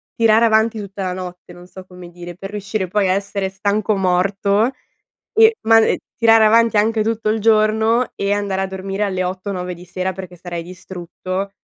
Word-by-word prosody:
tirare 225 0 +4
avanti 220 0 +2
tutta 200 -1 -7
la 185 -1 -2
notte, 180 -1 -8
non 175 0 -13
so 185 +1 -12
come 180 -1 -12
dire, 175 0 -9
per 195 +2 -8
riuscire 205 -1 -3
poi 200 +2 +1
a - - +3
essere 195 0 -2
stanco 205 +2 -1
morto, 195 +4 +1 0.7
e 445 0 +5
ma, 225 0 +7
ehm, 225 - +3 0.2
tirare 225 -1 +5
avanti 230 0 +4
anche 220 +1 +2
tutto 225 0 -2
il 220 +1 +1
giorno 220 +2 +2
e 200 0 -1
andare 200 -2 -1
a - - -1
dormire 190 +1 -5
alle 185 -3 -1
8-9 185 0 -4
di 175 +1 -13
sera 185 +1 -3
perché 185 -1 -9
sarai 175 -1 -6
distrutto, 185 +2 -6
195 Hz, 185 wpm, -19 LUFS, 185-215 Hz, 0.7 s, ma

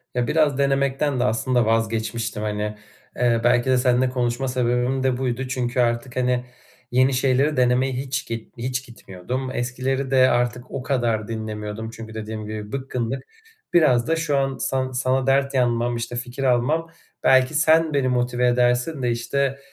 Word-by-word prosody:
Ya, 120 -1 0
biraz 150 -2 +2
denemekten 140 0 +1
de 120 - +2
aslında 120 +1 +1
vazgeçmiştim, 115 0 -1
hani, 105 -1 -2 0.5
eee, 120 -2 +2
belki 120 +1 +3
de 130 - +4
seninle 125 0 +2
konuşma 125 +1 -1
sebebim 125 +1 0
de 130 -2 +1
buydu. 130 0 -2
Çünkü 125 -1 -2
artık, 120 +1 0
hani, 125 -1 0 0.5
yeni 130 +2 +3
şeyleri 135 +3 +2
denemeye 125 +1 +2
hiç 135 +1 -3
git 115 0 -7
hiç 125 +2 -3
gitmiyordum. 120 +4 -6
Eskileri 130 +2 -2
de 130 -1 +5
artık 125 +1 -1
o 135 - -4
kadar 120 -6 0
dinlemiyordum 110 -1 -5
çünkü 115 -1 -9
dediğim 110 0 -5
gibi 105 0 -6
bıkkınlık. 130 -1 -3 0.5
Biraz 130 -8 +4
da 165 - +2
şu 155 -3 0
an 135 -1 0
san 130 -1 -1
sana 130 +1 0
dert 135 +1 +2
yanmam, 120 -2 +1
işte, 115 +1 -4
fikir 125 +2 -5
almam, 135 +6 +1 0.4
belki 130 +2 +4
sen 160 +1 +3
beni 140 -2 +1
motive 125 0 +1
edersin 125 +4 +1
de, 120 - +1
işte, 135 +3 -1
125 Hz, 160 wpm, -23 LUFS, 120-135 Hz, 0.5 s, de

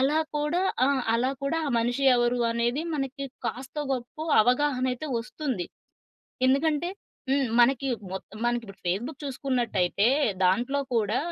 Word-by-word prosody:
అలా 285 +4 +3 0.2
కూడా 300 +5 0 0.2
ఆ! - - +3 0.3
అలా 250 +3 +2
కూడా 285 +4 0
ఆ - - 0
మనిషి 245 +4 0
ఎవరు 240 0 +2
అనేది 240 +5 0
మనకి 275 -1 -3 0.2
కాస్తొ 265 +4 -4
గొప్పో 260 +5 -4 0.2
అవగాహన 255 +3 +2
అయితే 250 +5 -5
వస్తుంది. 245 - -3 0.8
ఎందుకంటే 300 +5 +2 0.4
హ్మ్. 270 -2 +2
మనకి 270 +2 +3 0.2
మొత్తం 190 +2 -7
మనకిపుడు 240 -4 -1
ఫేస్‌బుక్ 225 - -2
చూసుకున్నట్టయితే 245 - 0 0.4
దాంట్లో 240 +10 +2
కూడా 220 +1 +1
255 Hz, 125 wpm, -27 LUFS, 235-280 Hz, 0.8 s, అలా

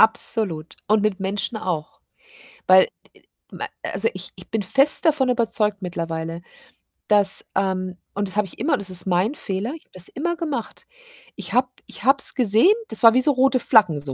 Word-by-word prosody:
Absolut, 215 -7 +1
und 210 0 +2
mit 210 -2 0
Menschen 195 +4 -3
auch. 165 -6 -4 0.7
Weil 185 0 +7 0.3
d - - -20
äh, - - -37 0.3
ma - - -4
a - - -9
also, - - +1
ich - - -8
ich - - -14
bin 220 - 0
fest 275 +9 +3
davon 295 -5 +3
überzeugt 215 -4 0
mittlerweile, 165 -2 -4 0.7
dass, 200 -2 +3
ähm 185 -1 -1 0.2
und 205 0 -2
das 190 - -3
habe 210 -2 +1
ich - - -11
immer 290 +7 0
und 280 - +1
es 200 -1 -3
ist 180 -1 +1
mein 190 +9 +1
Fehler, 200 +5 -4
ich 325 - -13
habe - - -41
das 185 -1 -1
immer 345 +4 -3
gemacht. 295 -9 -5 0.5
Ich - - -7
habe 250 +1 +3 0.2
ich - - -11
habe 275 +1 +5
es - - -3
gesehen, 240 - +4
das 220 - +2
war 230 0 +8
wie 255 - +3
so 290 +3 +3
rote 265 0 +2
Flaggen, 210 - +4
so 140 -2 -7
210 Hz, 205 wpm, -22 LUFS, 185-255 Hz, 0.7 s, war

